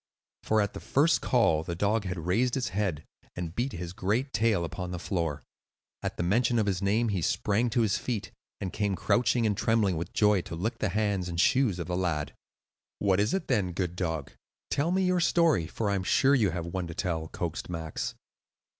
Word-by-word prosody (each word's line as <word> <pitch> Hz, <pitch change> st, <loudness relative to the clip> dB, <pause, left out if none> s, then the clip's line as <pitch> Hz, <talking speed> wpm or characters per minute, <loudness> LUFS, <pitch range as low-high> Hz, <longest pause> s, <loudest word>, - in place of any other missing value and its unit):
For 110 Hz, 0 st, +2 dB
at 100 Hz, -, -1 dB
the -, -, -6 dB
first 150 Hz, +4 st, +2 dB
call, 110 Hz, -, +3 dB
the 85 Hz, -, -4 dB
dog 105 Hz, +4 st, +1 dB
had 90 Hz, -3 st, -4 dB
raised 120 Hz, +8 st, +2 dB
his 125 Hz, -6 st, -1 dB
head 95 Hz, -6 st, -1 dB, 0.3 s
and 85 Hz, -2 st, -4 dB
beat 125 Hz, +7 st, -2 dB
his 85 Hz, 0 st, -5 dB
great 110 Hz, +9 st, -1 dB
tail 105 Hz, -5 st, +2 dB
upon 90 Hz, +2 st, -5 dB
the 90 Hz, -, -4 dB
floor. 85 Hz, -5 st, -2 dB, 0.6 s
At -, -, -4 dB
the -, -, -1 dB
mention 120 Hz, +6 st, +2 dB
of 110 Hz, -, +2 dB
his 95 Hz, -2 st, -1 dB
name 110 Hz, +4 st, +2 dB
he 95 Hz, -4 st, -1 dB
sprang 105 Hz, +8 st, +1 dB
to 120 Hz, +1 st, +1 dB
his 105 Hz, -3 st, +1 dB
feet, 115 Hz, -5 st, -3 dB, 0.3 s
and 95 Hz, -, -4 dB
came 100 Hz, -2 st, 0 dB
crouching 120 Hz, +5 st, +2 dB
and 105 Hz, -2 st, +2 dB
trembling 105 Hz, -5 st, +2 dB
with 85 Hz, +2 st, -4 dB
joy 105 Hz, -3 st, +3 dB
to 85 Hz, -, -7 dB
lick 110 Hz, +7 st, -3 dB
the 110 Hz, -, 0 dB
hands 100 Hz, -2 st, 0 dB
and 85 Hz, -1 st, -3 dB
shoes 125 Hz, -3 st, +3 dB
of 85 Hz, -, -4 dB
the 90 Hz, +2 st, -2 dB
lad. 75 Hz, -6 st, -1 dB, 0.6 s
"What 95 Hz, -2 st, +2 dB
is 105 Hz, -, +2 dB
it 190 Hz, -, -3 dB
then, 100 Hz, -8 st, +1 dB
good 90 Hz, -1 st, -2 dB
dog? 80 Hz, -6 st, -3 dB, 0.4 s
Tell 145 Hz, +4 st, +1 dB
me 190 Hz, +2 st, +2 dB
your 180 Hz, -1 st, +2 dB
story, 165 Hz, -, +3 dB
for 105 Hz, +4 st, -2 dB
I'm 95 Hz, -2 st, 0 dB
sure 135 Hz, +9 st, +4 dB
you 115 Hz, -8 st, +4 dB
have 85 Hz, 0 st, -3 dB
one 90 Hz, +1 st, -3 dB
to 85 Hz, -, -7 dB
tell," 80 Hz, -4 st, -2 dB
coaxed 85 Hz, +1 st, -4 dB
Max. 80 Hz, -3 st, -4 dB
100 Hz, 210 wpm, -28 LUFS, 85-115 Hz, 0.6 s, sure